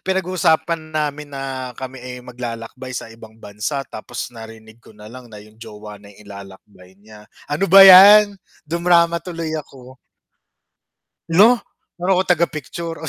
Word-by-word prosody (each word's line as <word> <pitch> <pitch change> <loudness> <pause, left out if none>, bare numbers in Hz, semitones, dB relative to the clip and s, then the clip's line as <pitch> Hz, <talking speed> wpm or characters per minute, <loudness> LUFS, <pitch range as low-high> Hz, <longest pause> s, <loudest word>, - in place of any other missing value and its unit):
pinag-uusapan 170 -3 -1
namin 150 -1 -4
na, 135 -2 -7
kami, 130 0 -9
eh, 125 0 -9
maglalakbay 125 +1 -8
sa 115 - -8
ibang 110 -1 -16
bansa. 110 +7 -6
Tapos 120 +2 -9
narinig 110 0 -14
ko 110 - -20
nalang 120 +4 -13
na 105 - -13
yung 110 +1 -21
jowa 105 -2 -12
na 100 - -17
yung 105 - -19
ilalakbay 100 -1 -15
niya. 105 +1 -18 0.2
Ano 170 +6 -1
ba 195 +2 +9
yan? 200 +2 +8 0.3
dumrama 170 +1 +1
tuloy 165 -2 -7
ako. 130 -4 -10 1.3
Hala! 210 +9 +5 0.4
Ano 180 +1 0
ko, - - +2
taga-picture? 165 -1 -3
Oh, 160 - -6
130 Hz, 140 wpm, -19 LUFS, 110-170 Hz, 1.3 s, ba